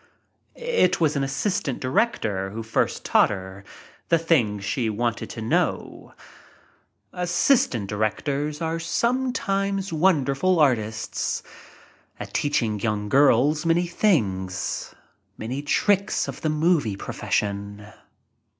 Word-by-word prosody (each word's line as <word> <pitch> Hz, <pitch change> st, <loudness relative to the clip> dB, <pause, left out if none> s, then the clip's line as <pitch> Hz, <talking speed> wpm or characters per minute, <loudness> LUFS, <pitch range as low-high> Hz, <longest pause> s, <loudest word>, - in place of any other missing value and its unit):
It 475 Hz, -, +1 dB
was 155 Hz, -2 st, +2 dB
an 140 Hz, -, 0 dB
assistant 140 Hz, -, -1 dB
director 130 Hz, -, 0 dB
who 110 Hz, +3 st, -6 dB
first 110 Hz, -, -1 dB
thaught -, -, +5 dB
her 95 Hz, 0 st, -7 dB, 0.5 s
the 170 Hz, -, +5 dB
things 120 Hz, -, +1 dB
she 115 Hz, +1 st, -1 dB
wanted 115 Hz, +2 st, -2 dB
to 115 Hz, -, -7 dB
know. 110 Hz, -, -2 dB, 1.0 s
Assistant 175 Hz, -, +1 dB
directors 140 Hz, +9 st, -2 dB
are 165 Hz, +1 st, -1 dB
sometimes 195 Hz, -2 st, -1 dB
wonder 155 Hz, -5 st, +2 dB
ful 185 Hz, +5 st, +1 dB
artists 110 Hz, -6 st, 0 dB, 0.8 s
at -, -, -8 dB
teaching 115 Hz, -8 st, 0 dB
young 105 Hz, -1 st, -2 dB
girls 145 Hz, +3 st, +4 dB
many 170 Hz, +1 st, +2 dB
things 100 Hz, -, -1 dB, 0.2 s
— -, -, -45 dB
many 125 Hz, +6 st, -4 dB
tricks 200 Hz, +7 st, +1 dB
of -, -, -7 dB
the 155 Hz, -, 0 dB
movie 155 Hz, -, +1 dB
profession. 100 Hz, +1 st, -3 dB
140 Hz, 115 wpm, -24 LUFS, 110-175 Hz, 1.0 s, thaught